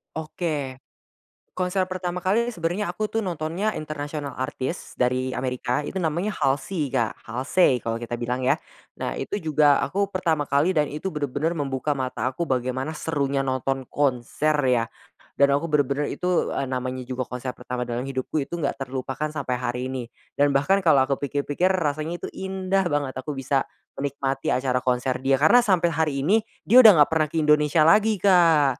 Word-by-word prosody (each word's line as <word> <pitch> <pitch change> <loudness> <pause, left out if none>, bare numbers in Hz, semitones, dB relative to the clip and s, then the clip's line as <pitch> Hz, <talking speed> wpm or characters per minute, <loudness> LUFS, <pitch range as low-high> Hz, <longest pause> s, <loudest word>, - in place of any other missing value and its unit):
Oke, 155 -4 -3 0.8
konser 185 +1 0
pertama 180 -1 -3
kali 230 +6 +1
sebenarnya 175 +2 -2
aku 215 +3 -2
tuh 225 -1 -2
nontonnya 175 +4 -2
international 145 -3 -5
artist 130 +5 -4
dari 130 +1 +1
Amerika 125 0 -1
itu 150 - -7
namanya 170 +3 0
Halsi, 145 -2 -1
Kak, 115 -5 -1
Halsey 130 +3 +2
kalau 115 0 -2
kita 120 0 -5
bilang 125 +2 -2
ya. - - +2 0.4
Nah - - -3
itu 200 +9 -3
juga 150 -2 +3
aku 200 +1 -1
pertama 165 -5 0
kali 150 +6 +1
dan 150 -1 +1
itu 155 +6 -3
bener-bener 150 +2 -2
membuka 140 0 -1
mata 130 -1 -2
aku 150 +6 -3
bagaimana 130 +2 -2
serunya 140 -3 -1
nonton 135 0 -2
konser 145 +2 0 0.2
ya, 120 -2 +3 0.5
dan 140 0 +4
aku 145 +4 +1
bener-bener 145 -1 +1
itu, 180 -1 0
eee, - - 0
namanya 130 -1 -3
juga 130 0 -4
konser 125 +1 -4
pertama 125 0 -5
dalam 120 +2 -4
hidupku 135 +3 -2
itu - - -5
enggak 140 -4 -3
terlupakan 135 +3 -3
sampai 125 -4 -2
hari 125 +1 -3
ini, 125 -3 -4 0.3
dan 145 -1 +3
bahkan 165 +9 +3
kalau 155 -8 +4
aku 135 +1 -1
pikir-pikir 145 +4 0
rasanya 155 0 -2
itu - - -4
indah 190 0 -1
banget 145 -4 -1
aku 145 +2 -5
bisa 135 0 0 0.3
menikmati 135 -1 -2
acara 125 0 +1
konser 125 0 0
dia. 135 +1 +2
Karena 155 - +6
sampai 180 -7 +2
hari 150 -3 0
ini 205 +8 +4 0.2
dia 245 +5 +7
udah 220 -7 +10
enggak - - -5
pernah 155 -1 +2
ke 155 - -12
Indonesia 150 +1 +4
lagi, 210 +7 +5
Kak, 165 -9 +4
145 Hz, 170 wpm, -24 LUFS, 130-170 Hz, 0.8 s, udah